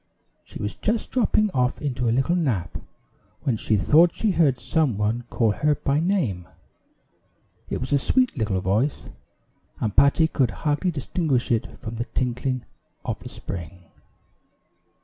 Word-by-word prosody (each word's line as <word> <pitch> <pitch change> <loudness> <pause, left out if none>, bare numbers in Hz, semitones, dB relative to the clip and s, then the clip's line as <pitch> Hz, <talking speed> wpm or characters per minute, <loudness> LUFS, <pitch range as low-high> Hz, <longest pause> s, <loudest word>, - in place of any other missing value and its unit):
She - - -10
was 105 - -3
just 220 +1 -2
dropping 215 -4 +2
off 125 -3 0
into 125 -5 -1
a - - +2
little 135 +8 +2
nap, 120 - -1 0.7
when 130 - +1
she 110 0 +1
thought 160 - +5
she 220 - +1
heard 155 -8 +3
some 150 -5 +1
one 110 +3 -1
call 115 -3 +2
her 150 +8 +1
by 140 +1 0
name. 155 - 0 1.2
It - - -2
was 130 +3 -3
a 140 - +4
sweet 255 - +2
little 105 -7 -1
voice, 105 +10 0 0.7
and 105 -3 -2
Patty 140 +3 +5
could 135 -6 +1 0.2
hardly 150 +5 +1
distinguish 145 -4 -1
it 115 -2 -1
from 115 0 -6
the 120 - -2
tinkling 130 0 -2 0.4
of - - -3
the - - -9
spring. 90 -1 -8
130 Hz, 150 wpm, -24 LUFS, 110-160 Hz, 1.2 s, thought